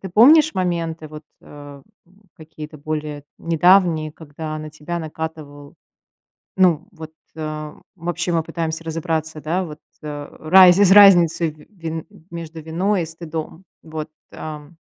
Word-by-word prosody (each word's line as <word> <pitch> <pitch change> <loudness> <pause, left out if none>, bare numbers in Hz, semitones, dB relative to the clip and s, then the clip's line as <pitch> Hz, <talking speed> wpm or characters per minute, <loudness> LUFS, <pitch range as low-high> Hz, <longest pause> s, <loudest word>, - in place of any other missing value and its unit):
Ты 190 - -6
помнишь 300 - +6
моменты, 170 -3 -2
вот, 155 +1 -11 0.2
э, 145 -1 -12 0.2
м, 190 +4 -26
какие-то 155 -1 -10
более 150 -1 -5
недавние, 165 -2 +3
когда 155 0 -7
на 155 0 -8
тебя 155 +3 -5
накатывал, 155 -2 -7 0.8
ну, 180 -2 +3
вот, 160 -3 -10 0.2
э, 155 -1 -5 0.2
вообще 175 +1 -3
мы 165 -1 +1
пытаемся 165 0 -4
разобраться, 160 -1 -3
да, 170 +6 -1
вот, 150 -3 -10 0.2
э, 145 -1 -7
раз 180 +3 +7
из 200 -2 +5
разницей 175 -5 +6
ви 150 0 -17
вин 165 -5 -6 0.2
между 165 -1 -8
виной 175 +5 0
и 160 - -4
стыдом. 165 +1 -7 0.2
Вот, 155 -1 -7 0.2
ам. 155 +1 -9
160 Hz, 135 wpm, -21 LUFS, 155-175 Hz, 0.8 s, раз